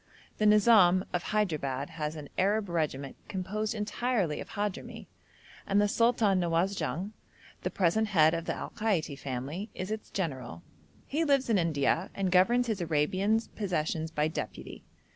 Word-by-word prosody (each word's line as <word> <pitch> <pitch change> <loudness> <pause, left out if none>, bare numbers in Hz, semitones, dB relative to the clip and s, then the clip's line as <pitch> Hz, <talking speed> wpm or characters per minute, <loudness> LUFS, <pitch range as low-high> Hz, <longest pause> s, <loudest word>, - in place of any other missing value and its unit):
The 215 - +4
Nizam 205 -4 +6
of 180 - 0
Hyderabad 150 -9 -1
has 155 -1 -4
an 150 -2 -8
Arab 200 +1 +1
regiment 150 -5 -2
composed 210 +4 -3
entirely 210 -5 -1
of - - -9
Hadhrami, 205 -2 -4 0.6
and 200 - +3
the 205 - +4
Sultan 225 -3 +3
Nawasjung, 175 0 -1 0.5
the - - -1
present 200 +4 +1
head 160 -6 +4
of 165 0 -2
the - - -2
Al - - -6
Kaiti 200 -10 -1
family, 140 - -5
is 185 +3 -4
its 220 0 -5
general: 130 - -4 0.4
he 310 +4 -1
lives 275 -5 +2
in 205 - +4
India 165 +3 +1
and 190 -2 -1
governs 235 +7 +4
his 220 -5 -2
Arabian 185 +7 +1
possessions 160 -5 -1
by 150 -1 0
deputy. 160 - -6
185 Hz, 150 wpm, -30 LUFS, 160-210 Hz, 0.6 s, Nizam